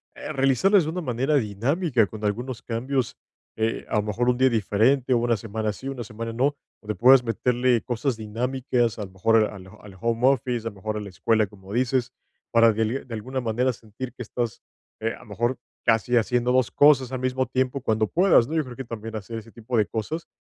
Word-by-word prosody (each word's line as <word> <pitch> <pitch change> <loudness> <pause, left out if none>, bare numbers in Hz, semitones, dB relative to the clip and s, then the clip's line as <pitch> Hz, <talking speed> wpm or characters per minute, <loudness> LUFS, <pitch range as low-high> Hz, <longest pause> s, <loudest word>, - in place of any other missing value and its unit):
eh, - - -6
realizarlas 135 - +4
de 155 - -3
una 180 +2 -3
manera 135 +1 0
dinámica 125 - +1
con 110 +1 -10
algunos 115 +3 -2
cambios, 125 +2 -2 0.4
eh, 110 0 -1
a - - -1
lo 105 - +2
mejor, 115 +4 0
un 125 - +2
día 130 0 +4
diferente, 120 +4 +2
o 120 - +4
una 115 -1 +1
semana 110 0 -3
sí, 130 +6 -9
una 130 -3 -4
semana 115 +1 -6
no, 140 +5 +1 0.3
donde 105 -1 -4
puedas 130 +1 +6
meterle 125 0 +1
cosas 120 +1 -1
dinámicas, 120 +1 -1
a 105 - -3
lo 95 - -14
mejor 115 +5 +3
al 95 -3 -8
al 100 -2 -13
home 115 +3 +1
office, 125 -4 +1
a - - 0
lo - - -18
mejor 105 +3 -4
a - - -2
la 100 -1 -7
escuela, 110 +3 +1
como 95 0 -12
dices, 125 0 +1 0.4
para 115 -1 +5
de 110 +5 -1
de 120 - -9
alguna 130 +4 -4
manera 125 +2 0
sentir 115 +3 -8
que - - -10
estás, 120 0 -4 0.4
eh, 115 +1 -1
a - - -16
lo - - -15
mejor, 120 +5 -1 0.3
casi 115 +1 +3
haciendo 125 +2 +1
2 130 -2 +3
cosas 135 -3 +5
al 130 - -3
mismo 130 +1 0
tiempo, 130 +2 0
cuando 110 -3 +1
puedas, 175 - +4
¿no? 160 - -4
Yo 155 - +2
creo 125 -3 -9
que 135 - -6
también 115 -1 -7
hacer 115 +2 -6
ese 115 +1 -14
tipo 115 +1 -4
de 105 - +4
cosas 155 +10 -4
120 Hz, 220 wpm, -25 LUFS, 110-130 Hz, 0.4 s, puedas